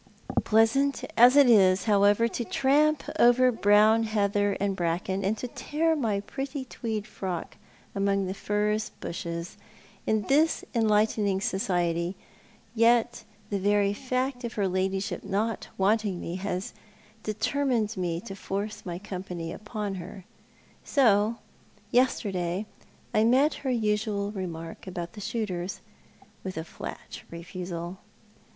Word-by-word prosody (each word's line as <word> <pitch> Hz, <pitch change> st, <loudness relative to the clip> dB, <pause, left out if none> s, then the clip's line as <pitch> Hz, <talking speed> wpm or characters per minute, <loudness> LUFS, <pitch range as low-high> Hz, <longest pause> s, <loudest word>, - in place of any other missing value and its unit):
Pleasant 225 Hz, +6 st, +3 dB
as 245 Hz, +3 st, +7 dB
it 285 Hz, -2 st, +7 dB
is, 195 Hz, -5 st, +5 dB
however, 205 Hz, +1 st, +4 dB
to 240 Hz, -, -3 dB
tramp 295 Hz, +5 st, +2 dB, 0.2 s
over 250 Hz, +1 st, +6 dB
brown 215 Hz, 0 st, +5 dB
heather 205 Hz, -2 st, +1 dB
and 200 Hz, -1 st, 0 dB
bracken, 180 Hz, +2 st, -1 dB
and 205 Hz, +3 st, 0 dB
tear 305 Hz, +7 st, -1 dB
my 220 Hz, -9 st, 0 dB
pretty 270 Hz, +4 st, -5 dB
tweed 220 Hz, -4 st, -4 dB
frock 185 Hz, -6 st, -5 dB, 0.4 s
among 195 Hz, 0 st, +1 dB
the 185 Hz, -, -3 dB
furze 210 Hz, +2 st, -1 dB
bushes, 170 Hz, 0 st, -5 dB, 0.5 s
in 220 Hz, -1 st, +2 dB
this 300 Hz, +8 st, +2 dB
enlightening 215 Hz, -3 st, +2 dB
society, 175 Hz, -2 st, 0 dB, 0.6 s
yet 235 Hz, +1 st, +3 dB, 0.3 s
the 200 Hz, -, 0 dB
very 205 Hz, +1 st, +2 dB
fact 255 Hz, +2 st, -2 dB
of 235 Hz, -2 st, -4 dB
her 200 Hz, -2 st, 0 dB
ladyship 190 Hz, +1 st, -1 dB
not 210 Hz, +3 st, -2 dB
wanting 200 Hz, -1 st, +1 dB
me 170 Hz, +2 st, -4 dB
has 195 Hz, +3 st, -3 dB, 0.5 s
determined 230 Hz, +1 st, 0 dB
mc 175 Hz, -3 st, -2 dB
to 195 Hz, -, -6 dB
force 205 Hz, +2 st, -4 dB
my 175 Hz, -2 st, -5 dB
com 190 Hz, -1 st, -6 dB
pany 170 Hz, -3 st, -5 dB
upon 210 Hz, -2 st, -5 dB
her, 185 Hz, +1 st, -10 dB, 0.6 s
so 225 Hz, -5 st, +3 dB, 0.6 s
yesterday 200 Hz, -7 st, +1 dB, 0.5 s
I 215 Hz, -, +4 dB
met 265 Hz, +7 st, +4 dB
her 270 Hz, -, -2 dB
usual 210 Hz, -3 st, 0 dB
remark 170 Hz, -4 st, -6 dB
about 175 Hz, -2 st, -5 dB
the 210 Hz, -, -9 dB
shooters 195 Hz, -5 st, -3 dB, 0.6 s
with 185 Hz, -2 st, -5 dB
a 160 Hz, -, -2 dB
flat 160 Hz, -, -8 dB
refusal. 175 Hz, +1 st, -6 dB
205 Hz, 125 wpm, -27 LUFS, 190-230 Hz, 0.6 s, as